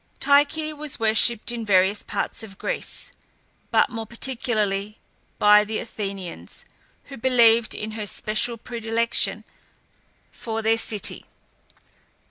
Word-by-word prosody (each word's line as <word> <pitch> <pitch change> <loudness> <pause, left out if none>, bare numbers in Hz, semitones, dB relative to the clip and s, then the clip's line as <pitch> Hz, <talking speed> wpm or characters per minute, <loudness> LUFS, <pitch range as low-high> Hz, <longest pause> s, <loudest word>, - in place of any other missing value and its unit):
Tyche 290 +3 +3
was 300 -1 -5
worshipped 225 +1 +2
in 235 -1 -4
various 200 0 +3
parts - - -4
of 200 -3 -9
Greece, - - -4 0.6
but - - +3
more 225 -2 -5
particularly 215 -4 -2 0.4
by 210 0 +6
the 215 +1 -3
Athenians, 195 -5 -6 0.4
who 275 - -10
believed 235 -2 +4
in 215 +1 -4
her 215 -1 -5
special 215 +4 0
predilection 230 0 -1 0.9
for 225 -1 -4
their 225 +1 +3
city. 210 -2 -1
225 Hz, 110 wpm, -24 LUFS, 210-235 Hz, 0.9 s, by